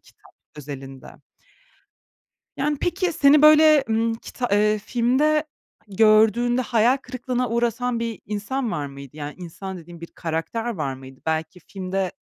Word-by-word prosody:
kitap - - -23 0.2
özelinde. 135 -2 -9 1.5
Yani, 290 +1 -1
peki 355 0 0
seni, 285 0 +5
böyle, 305 -1 +7
hımm, 225 +1 0
kita 245 +2 -5
eee, 210 +1 +3
filmde 260 +8 +1 0.4
gördüğünde 220 +4 +4
hayal 240 +1 +2
kırıklığına 250 -1 -3
uğratan 235 +1 0
bir 230 -2 -4
insan 215 +5 -3
var 145 -7 -3
mıydı? 140 0 -11
Yani 145 -1 -6
insan 185 +2 -7
dediğim: 170 0 -13
Bir 170 - -7
karakter 170 +8 -3
var 140 -6 -3
mıydı? 130 0 -13
Belki 160 +3 -2
filmde, 190 +1 -4
220 Hz, 130 wpm, -23 LUFS, 170-250 Hz, 1.5 s, böyle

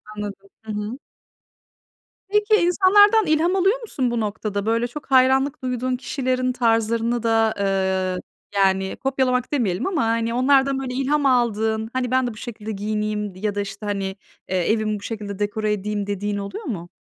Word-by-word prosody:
Anladım. 200 -1 -7
Hı 220 - -6
hı. 210 +3 -4 1.3
Peki 420 +1 +3
insanlardan 410 +3 +5
ilham 325 +3 +2
alıyor 390 +6 +2
musun 265 - -2
bu 235 - -1
noktada? 210 -1 -3
Böyle 230 +2 +1
çok 285 +2 -10
hayranlık 265 +1 +4
duyduğun 255 0 -1
kişilerin 255 -1 -1
tarzlarını 230 0 +1
da, 225 -1 +3
ııı, 190 -2 0 0.4
yani 190 -1 +2
kopyalamak 260 -2 0
demeyelim 220 - 0
ama 350 -7 0
hani 230 0 0
onlardan 270 +2 +3
böyle 255 -2 -4
ilham 280 +3 +1
aldığın, 220 -3 +1
"Hani 250 -1 -1
ben 260 -1 +2
de 240 - -4
bu 215 - -14
şekilde 220 -3 -6
giyineyim." 210 -1 -2
ya 205 +2 -2
da 205 - 0
işte, 200 +1 -7
"Hani, 200 -1 -2 0.4
eee, 185 +1 +1
evimi 215 -1 0
bu - - -15
şekilde 205 -3 -5
dekore 210 +1 0
edeyim." 205 0 -3
dediğin 205 +1 -2
oluyor 200 - -6
mu? 175 - -5
225 Hz, 160 wpm, -22 LUFS, 205-260 Hz, 1.3 s, insanlardan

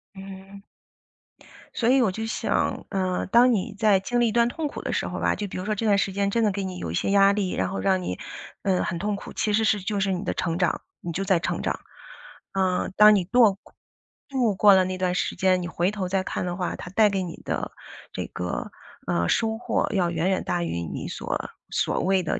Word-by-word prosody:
嗯。 195 +1 -10 1.1
所 235 - +1
以 265 +1 +5
我 220 -6 +2
就 220 +4 -4
想， 225 - -1
呃， 185 -2 -1
当 240 +4 +5
你 205 0 -2
在 210 -3 +4
经 240 +6 -1
历 240 - +4
一 - - -2
段 235 +1 +3
痛 315 +4 -3
苦 - - -7
的 - - -3
时 - - -1
候 - - -5
吧， - - +1
就 205 - -4
比 185 - -7
如 185 - -4
说 215 0 0
这 225 - -3
段 205 -2 +4
时 200 - 0
间 200 +1 0
真 230 +2 +1
的 210 - +3
给 195 0 -3
你 185 -1 -5
有 80 - -4
一 - - -5
些 195 - 0
压 200 0 +6
力， 200 -3 -1
然 - - -1
后 195 - -4
让 190 -1 +2
你， 90 - -4 0.5
嗯， 190 -2 +1
很 175 - -2
痛 205 +2 -1
苦， 200 - -9
其 210 - 0
实 220 +2 +3
是 210 -1 +2
就 205 +2 -2
是 195 0 +1
你 185 0 -2
的 - - -1
成 165 -1 -2
长， 180 -3 0 0.2
你 170 - -4
就 190 +4 -2
在 190 -3 +2
成 - - -2
长。 - - -2 0.7
啊， 190 -2 0
当 210 0 +9
你 195 - +2
剁 215 +3 +4
过 - - -21 0.5
度 250 -7 +1
过 205 +1 +7
了 190 -1 +5
那 185 0 -3
段 185 -1 0
时 - - -1
间， 185 -1 +2
你 175 - -4
回 180 +1 0
头 200 -3 -3
再 190 +1 0
看 - - -3
的 175 -1 -3
话， 180 -1 -2
它 - - -8
带 210 +3 +4
给 195 -1 -1
你 170 -3 -7
的， - - -3 0.4
这 - - -4
个， 90 -1 -4 0.4
呃， 85 0 +1
收 220 -1 +1
获 - - 0
要 180 -4 +2
远 170 +2 0
远 190 - 0
大 175 - -1
于 85 - -3
你 85 - -5
所 - - -4 0.2
所 - - 0
谓 190 0 +2
的 165 - -1
195 Hz, 265 characters per minute, -25 LUFS, 185-210 Hz, 1.1 s, 当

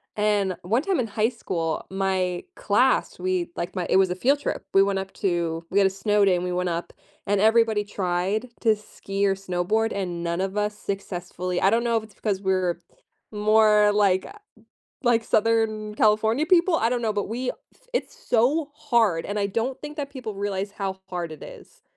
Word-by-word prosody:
And 205 -3 +1
one 220 +8 +1
time, 385 -4 0
in 240 - 0
high 215 +1 +1
school, 165 -9 -3
my 190 -2 -1
class, - - +2
we, 370 -2 -1
like 175 +3 -4
my 180 -2 -2
it - - +4
was 190 -1 +4
a - - -1
field 275 +9 +2
trip. 290 - -3
We 195 - +6
went 195 -1 0
up 190 0 -6
to 170 -3 -1
we 200 - +3
had 195 - +5
a - - +1
snow 205 +2 +1
day, 190 -2 +4
and 175 - -2
we 180 - -2
went 180 0 -1
up, 170 0 -4 0.3
and 200 0 +2
everybody 220 -1 +4
tried 195 +3 -2
to 220 -2 +4
ski 200 -1 -4
or 195 - +3
snowboard, 195 +4 -1
and 180 -4 -3
none 170 0 -2
of 195 +1 -2
us 210 0 -1
successfully 180 -2 -4
I 195 - +5
don't 230 +1 +2
know 235 -1 +2
if 220 - -2
it's 220 -2 -15
because 200 -3 -2
we're 185 -3 0 0.5
more 210 0 +4
like 195 -3 +3
a 415 - -12 0.7
like 235 -1 +3
Southern 215 -1 +1
California 220 +6 +3
people? 350 0 +4
I 225 - +2
don't 245 -1 -1
know, 225 -2 +1
but 205 -1 -2
we 250 +3 -2 0.4
it's - - -2
so 280 +6 +1
hard, 235 - +1
and 205 - -3
I 200 - +1
don't 230 +6 -2
think 295 0 -7
that 285 -2 -3
people 250 -6 -6
realize 200 0 -3
how 195 -2 -4
hard 175 -3 -4
it 155 - -11
is. - - -13
205 Hz, 200 wpm, -25 LUFS, 190-225 Hz, 0.7 s, We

